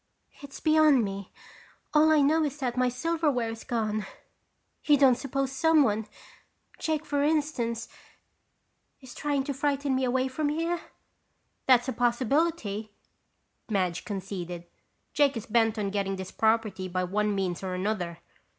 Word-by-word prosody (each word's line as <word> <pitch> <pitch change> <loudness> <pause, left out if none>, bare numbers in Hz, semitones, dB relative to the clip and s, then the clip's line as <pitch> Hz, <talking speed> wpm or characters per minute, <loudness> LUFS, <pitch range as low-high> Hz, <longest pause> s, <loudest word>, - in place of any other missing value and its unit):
"It's 280 -1 -10
beyond 310 -5 +5
me. 195 -1 -5 0.6
All 310 +1 +5
I 310 -1 +5
know 310 +3 +3
is 290 -1 -2
that 250 -4 -2
my 250 0 +2
silverware 285 -3 0
is 225 - -8
gone. 215 -3 -2 0.8
You 295 -1 +5
don't 270 -2 +6
suppose 275 +1 -2
someone—Jake 290 +2 -1
for 285 -1 0
instance, 285 -7 0 1.1
is 260 -3 -12
trying 290 -2 -1
to 280 - -3
frighten 280 0 0
me 260 0 0
away 255 +1 +1
from 290 +3 -1
here?" 330 +3 -1 0.9
"That's 250 -1 +5
a 260 - -1
possibility," 240 -2 0 0.8
Madge 185 -5 0
conceded. 180 -4 -5 0.5
"Jake 285 -3 +3
is 225 - -6
bent 225 0 +2
on 200 -2 -1
getting 195 -1 -1
this 190 -1 -7
property 220 -4 +1
by 185 0 -2
one 205 +3 0
means 185 -3 -2
or 185 -1 -3
another. 180 -3 -2
245 Hz, 140 wpm, -28 LUFS, 210-290 Hz, 1.1 s, don't